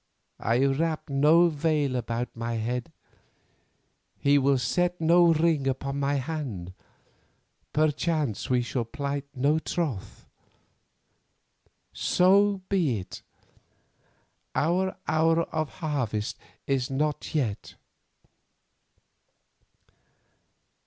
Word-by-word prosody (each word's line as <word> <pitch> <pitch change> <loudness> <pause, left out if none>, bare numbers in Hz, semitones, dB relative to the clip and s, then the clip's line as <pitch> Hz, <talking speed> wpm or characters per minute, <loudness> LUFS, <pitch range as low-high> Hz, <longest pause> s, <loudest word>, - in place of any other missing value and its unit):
I 120 +4 +2
wrap 155 +2 -1
no 155 +5 +5
veil 150 -3 0
about 120 0 -3
my 115 0 -3
head, 120 +2 -3 1.3
he 145 0 +3
will 135 0 +3
set 175 +7 0
no 170 +1 +5
ring 160 -3 +2
upon 135 +1 -2
my 140 +1 +1
hand, 130 - -4 1.0
perchance 150 - 0
we 125 -1 +2
shall 120 0 -2
plight 140 +4 -4
no 145 +5 +2
troth. 150 - -4 1.7
So 195 +1 +3
be 165 - +1
it; 95 -1 -8 1.3
our 185 +4 +1
hour 165 +1 +3
of 155 -2 -1
harvest 130 - -3 0.3
is 130 -2 0
not 150 +3 -2
yet. 120 -9 -2
145 Hz, 90 wpm, -27 LUFS, 125-160 Hz, 1.7 s, no